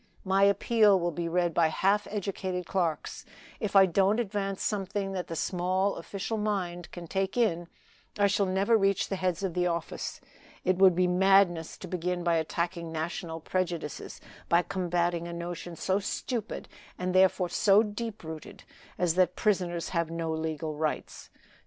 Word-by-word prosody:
My 195 +1 +4
appeal 205 0 +4
will 175 0 0
be 170 +1 -3
read 175 0 +1
by 165 0 +4
half 200 +6 +1
educated 190 -3 -3
clerks. 170 -5 -2 0.4
If 210 -2 -3
I 195 -1 +9
don't 195 +4 +2
advance 195 -3 -2
something 200 -1 -2
that 185 -2 -4
the 165 - -5
small 185 +4 0
official 200 +5 -4
mind 180 -5 -2
can 175 -1 -8
take 190 +5 -2
in, 175 -8 +1 0.5
I 205 - +4
shall 200 0 +2
never 195 +5 +2
reach 195 -3 +2
the 195 - -1
heads 185 -1 -1
of 190 -3 -1
the 180 0 +1
office. 170 -1 -3 0.5
It 185 0 +2
would 190 -2 +6
be 185 +1 +3
madness 180 -2 +3
to 185 - -8
begin 180 0 -2
by 170 -1 +2
attacking 170 +1 -2
national 165 0 -4
prejudices, 170 -4 -3 0.3
by 170 +1 +4
combating 175 -2 -1
a 170 - -6
notion 170 0 -6
so 190 +4 0
stupid, 225 +2 -4 0.3
and 180 0 -2
therefore 185 -1 +4
so 200 +4 +4
deep 215 0 -5
rooted, 160 -1 -9 0.3
as 175 -2 +2
that 180 0 +2
prisoners 180 -5 0
have 170 -2 -1
no 165 -1 -3
legal 160 0 -3
rights. 155 0 -3
180 Hz, 165 wpm, -29 LUFS, 170-195 Hz, 0.5 s, I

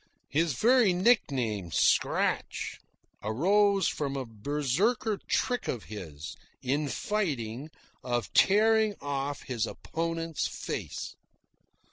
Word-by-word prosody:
(His 160 +1 +1
very 235 - +4
nickname, 130 - +1
"Scratch," - - +1 0.4
arose 195 - +3
from 140 -2 -2
a 135 - -3
Berserker 150 - 0
trick 245 -1 0
of 120 - -2
his, 80 -8 -8 0.3
in 145 +4 0
fighting, 140 - -2 0.3
of 120 -2 -2
tearing 215 +1 +4
off 140 0 -3
his 120 -4 -2
opponent's 165 -1 -3
face.) - - -5
150 Hz, 95 wpm, -29 LUFS, 125-200 Hz, 0.4 s, very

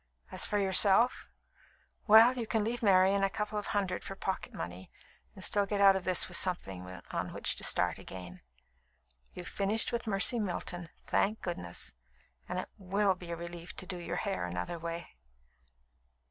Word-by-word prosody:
As - - +1
for 210 - 0
yourself 200 +4 +4 0.8
well, 225 +4 +8
you 235 -3 -4
can 220 -1 0
leave 235 +3 -2
Marian 195 -1 +4
a 195 - +3
couple 210 +1 -3
of 205 - -6
hundred 195 -3 -2
for 195 - -7
pocket 190 0 -4
money, 90 +2 -7 0.5
and - - -9
still 205 -1 +1
get 205 0 -2
out 195 -1 +7
of 190 - -3
this 185 0 +2
with 180 - +2
something 95 - -1 0.2
on - - -3
which - - +2
to - - -3
start - - +3
again. 90 -1 -9 0.9
You've 180 0 -7
finished 205 +3 +1
with 235 -1 -3
Mercy 215 +4 +2
Milton, 175 -3 -4 0.2
thank 215 +2 0
goodness! 85 - -5 0.6
and - - -3
it - - -4
will 195 +1 +1
be 180 -1 -11
a 170 - -3
relief 170 +1 -8
to - - -5
do 185 -1 -5
your 175 0 -5
hair 195 - -2
another 90 - -4
way." 170 - -7
190 Hz, 175 wpm, -31 LUFS, 170-205 Hz, 0.9 s, well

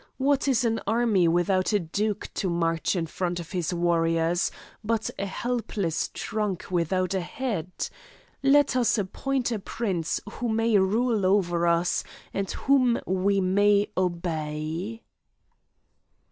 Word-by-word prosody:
What 280 +1 +2
is 250 -3 +2
an 225 -1 0
army 220 -5 +3
without 185 +4 +2
a 205 - +4
duke 205 +5 -2
to 190 - -1
march 165 +1 0
in 170 -2 0
front 175 +2 -3
of 170 -1 -8
his 180 -4 -1
warriors, 170 0 +1 0.3
but 220 0 -1
a 200 - -1
helpless 210 -7 -2
trunk 210 -4 -3
without 185 +2 0
a 190 - 0
head? 205 - -3 0.7
Let 275 0 +4
us 245 -2 +3
appoint 245 +6 -1
a 225 - -1
prince 190 -6 -2
who 235 +2 -4
may 225 0 +2
rule 215 +3 +1
over 175 -3 +2
us, 170 +1 +2 0.3
and 195 -1 -2
whom 255 -4 +2
we 195 +2 +1
may 200 +2 +3
obey." 170 +3 -2
195 Hz, 130 wpm, -26 LUFS, 175-225 Hz, 0.7 s, a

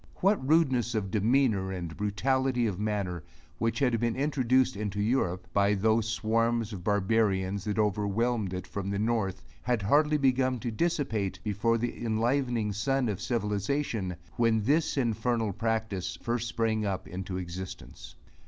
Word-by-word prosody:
What 195 -4 +2
rudeness 130 -7 +3
of 100 -3 -2
demeanor 110 -3 +2
and 85 -3 -5
brutality 125 +4 +1
of 100 -4 -2
manner, 100 -5 -2 0.4
which 115 0 0
had 125 -5 +2
been 115 0 0
introduced 130 -3 +2
into 105 0 -3
Europe, 105 -5 0
by 100 +1 +3
those 110 +2 +2
swarms 115 0 0
of 90 -3 -7
barbarians, 100 -1 +1
that 105 0 -2
overwhelmed 105 +1 0
it 90 -1 -4
from 100 0 -4
the 100 - -1
north, 105 -3 -1 0.2
had 120 -4 0
hardly 150 +8 +3
begun 130 -2 +2
to 120 - -2
dissipate 110 - -1
before 110 +2 +1
the 120 +1 -3
enlivening 115 -1 0
sun 125 +4 0
of 100 - -3
civilization, 105 -2 -1 0.2
when 115 -2 +3
this 150 +6 +1
infernal 115 -3 0
practice 110 -4 -2
first 120 0 -2
sprang 115 -2 0
up 100 -3 -2
into 95 +1 -5
existence. 90 +1 -8
110 Hz, 145 wpm, -29 LUFS, 100-120 Hz, 0.4 s, rudeness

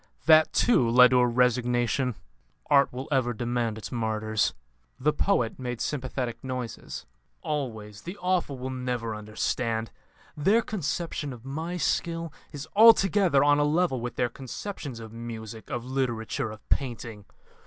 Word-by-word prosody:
That, 155 -1 +6
too, 130 - +3
led 125 +2 +7
to 125 - +5
a 125 - +4
resignation: 125 0 +1 0.6
Art 140 -1 +5
will 130 +4 -6
ever 130 -3 +2
demand 120 -1 -1
its 110 - -7
martyrs." 110 -3 0 0.4
The 150 +4 +2
poet 145 - +1
made 125 -2 -4
sympathetic 130 -4 -3
noises. 130 -3 -5 0.4
"Always. 110 -8 -4
The 180 +4 -7
awful 180 -6 0
many - - -12
will 130 - -2
never 125 -3 -3
understand. 110 +1 -2 0.4
Their 200 +10 +3
conception 170 -6 -3
of 120 0 -13
my 160 +6 -4
skill 165 -2 -1 0.2
is 145 -1 -7
altogether 200 -8 +6
on 145 0 +4
a - - +4
level 150 -3 +1
with 125 0 -4
their 125 - +1
conceptions 135 - -7
of 110 -1 -9
music, 115 -1 -8
of 120 0 -4
literature, 125 -5 -2
of 110 0 -11
painting. 115 -5 -2
125 Hz, 145 wpm, -27 LUFS, 115-150 Hz, 0.6 s, led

